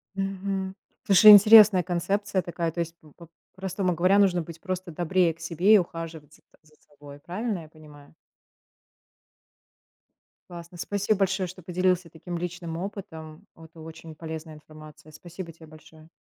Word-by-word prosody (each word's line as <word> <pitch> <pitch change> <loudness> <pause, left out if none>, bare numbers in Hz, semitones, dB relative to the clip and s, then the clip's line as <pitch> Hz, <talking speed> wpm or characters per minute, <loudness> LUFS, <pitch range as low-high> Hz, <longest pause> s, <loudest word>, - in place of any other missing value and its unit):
Мгм. 195 0 -4 0.3
Слушай, 200 +2 +8
интересная 210 -2 +8
концепция 190 +3 -2
такая, 170 -2 -4
то 170 - -8
есть, 165 0 -4
по 155 -2 -20 0.4
по-простому 190 -1 -2
говоря, 185 +4 +2
нужно 185 -3 +2
быть 165 0 -11
просто 185 -2 -5
добрее 175 +1 0
к 165 - -28
себе 170 +5 +2
и - - +8
ухаживать 165 -4 -6
за - - -25 0.2
за 155 0 -26
собой, 145 -1 -14
правильно 190 +5 -4
я 160 - -12
понимаю? 150 -2 -17 2.4
Классно. 170 0 -11
Спасибо 205 +3 -2
большое, 190 -1 0
что 185 +1 -12
поделился 180 0 -1
таким 170 +2 -8
личным 175 -1 -6
опытом, 170 -3 -9
это 165 0 -16
очень 160 0 -11
полезная 160 0 -8
информация. 155 0 -15
Спасибо 175 +2 -10
те 160 0 -16
большое! 155 0 -17
175 Hz, 145 wpm, -25 LUFS, 160-190 Hz, 2.4 s, Слушай